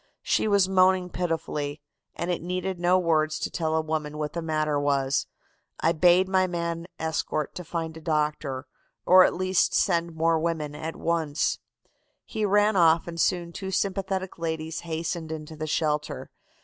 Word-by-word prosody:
She - - +1
was 200 -3 +4
moaning 185 -1 +3
pitifully, 160 -4 -2 0.4
and 175 +1 -2
it 175 - -2
needed 180 +1 -3
no 175 +1 +4
words 155 -3 +1
to - - -3
tell 160 -2 -1
a 160 - +2
woman 155 -1 -3
what 150 -1 -3
the 170 - -3
matter 155 -2 0
was, 140 -1 +1 0.5
I 165 - +3
bade 175 +3 +4
my 190 -1 +2
man 170 -1 -3
escort 160 -2 -2
to 180 - -6
find 165 -1 -4
a 160 - -9
doctor, 150 -4 -1 0.4
or 185 0 +8
at - - 0
least 185 0 +1
send 170 -3 +1
more 165 0 +2
women 155 -3 -2
at 160 +2 -5
once. 160 -3 0 0.7
He 215 -2 -2
ran 205 +1 +3
off 165 -2 +4
and 170 -1 -3
soon 170 -2 0
two 190 +1 -5
sympathetic 190 -1 -2
ladies 160 -1 -3
hastened 165 0 -4
into 155 0 -6
the 155 0 -4
shelter. 150 -1 -1
165 Hz, 165 wpm, -26 LUFS, 155-180 Hz, 0.7 s, or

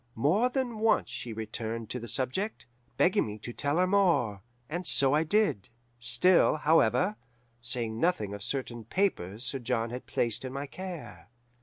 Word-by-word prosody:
More 180 - +2
than 245 -4 -2
once 225 +1 +2
she 120 - -6
returned 110 +1 -5
to 125 - -3
the 120 - -8
subject, 135 - -2 0.3
begging 190 +3 +3
me 105 0 -6
to 120 +3 -8
tell 145 +5 -1
her 180 - +4
more; 175 - +2 0.3
and 175 +4 -4
so 135 0 +4
I 155 +2 +3
did, 180 - +1 0.3
still, 125 +12 +5
however, 165 +6 +2 0.4
saying 120 -2 -1
nothing 110 - 0
of 100 - -7
certain 120 -1 -3
papers 115 - -1
Sir 135 +3 -2
John 115 -2 -1
had 125 +1 -7
placed 115 0 -1
in 130 0 -6
my 140 +1 -4
care. 155 - -9
130 Hz, 165 wpm, -29 LUFS, 115-180 Hz, 0.4 s, still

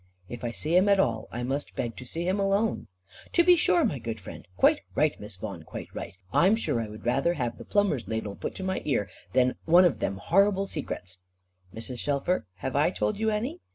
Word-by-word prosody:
"If 120 +3 -8
I 120 - -1
see 155 +8 -1
him 190 +3 +5
at 200 -1 +5
all, 115 -10 +1
I 120 +1 -4
must 135 +4 -3
beg 115 -2 -3
to 125 - -8
see 165 +7 -3
him 190 +2 +1
alone." 200 +3 +1 0.5
"To 345 - +5
be 355 +1 +7
sure, 180 - +3
my 140 - -1
good 115 -1 -5
friend. 95 - -10
Quite - - +4
right, - - +3
Miss 105 -2 -9
Vaughan, 95 -2 -6
quite 80 - -9
right. - - -6 0.2
I'm 190 +5 +5
sure 125 - -1
I 110 - -4
would 105 +1 -11
rather 135 +8 +2
have 120 -5 -3
the - - -9
plumber's 190 - +1
ladle 110 -2 -3
put - - -5
to 190 - -6
my 190 0 -1
ear, 105 -10 0 0.2
than 125 0 +3
one 175 +3 +7
of 175 - +2
them 95 - -1
horrible 195 - +3
secrets." 90 - -5 0.5
"Mrs. 115 +4 -6
Shelfer, 145 - 0 0.2
have 130 - -2
I 145 +4 +4
told 200 +2 -1
you 220 0 +2
any? 240 +11 -2
145 Hz, 225 wpm, -27 LUFS, 115-195 Hz, 0.5 s, be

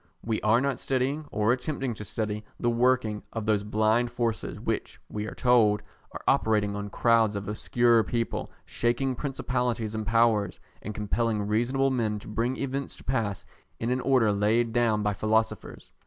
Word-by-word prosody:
We 110 -1 -1
are 105 +3 +4
not 135 -1 -1
studying 135 +3 -1
or 105 +3 +2
attempting 130 -1 -2
to 105 - -8
study 105 0 -3 0.2
the 120 - +1
working 120 -3 +2
of 115 -2 -3
those 105 -2 +2
blind 110 +3 +2
forces 115 -2 -2
which, - - -3
we 105 0 -4
are - - -7
told, 115 -5 +3 0.3
are - - -8
operating 105 -2 +2
on 100 0 -4
crowds 115 -1 +3
of 100 -1 -4
obscure 115 +2 +3
people, 115 0 -2
shaking 125 +3 0
principalities 125 -4 -2
and 110 -2 -4
powers, 110 -3 +2 0.2
and 105 - -6
compelling 110 0 0
reasonable 125 +6 +1
men 110 -5 0
to 105 - -11
bring 115 +4 -1
events 140 0 -3
to - - -16
pass 110 -7 -2 0.3
in 115 +2 -1
an 125 0 0
order 125 -6 +3
laid 110 +3 +1
down 115 -3 +2
by 105 0 +1
philosophers. 110 +3 -1
115 Hz, 170 wpm, -27 LUFS, 105-125 Hz, 0.3 s, are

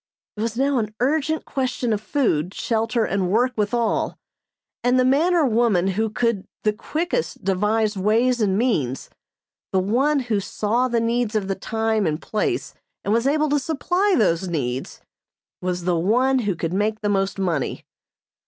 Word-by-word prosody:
It 210 - -5
was 230 0 -2
now 275 0 +2
an 215 -1 -4
urgent 310 +4 0
question 255 -3 -1
of 205 - -2
food, 190 - 0
shelter 225 0 0
and 190 -2 -1
work 245 +6 +2
with 210 -2 0
all, 235 -2 0 0.7
and 250 +1 +3
the 255 - +4
man 310 +8 +3
or 330 -4 +4
woman 220 -6 +2
who 220 +4 0
could 225 -2 -1 0.2
the 215 - +2
quickest 345 - -3
devise 210 +3 +1
ways 225 +5 +2
and 195 -2 +2
means, 155 - -1 0.6
the - - +1
one 265 +10 +2
who 230 -5 0
saw 220 +5 0
the 235 -2 +1
needs 230 -1 0
of 205 -3 0
the 195 - 0
time 220 0 -1
and 155 0 -1
place 215 - -2 0.3
and 205 - 0
was 230 +3 +2
able 305 +1 +2
to 290 0 +2
supply 355 +8 +1
those 185 -4 +2
needs, 130 -7 -3 0.6
was 180 -1 -2
the 180 0 +1
one 250 +9 +2
who 205 -6 -1
could 165 +1 -3
make 215 +3 0
the 210 - -1
most 195 -1 0
money. 170 -8 -2
220 Hz, 170 wpm, -22 LUFS, 195-255 Hz, 0.7 s, the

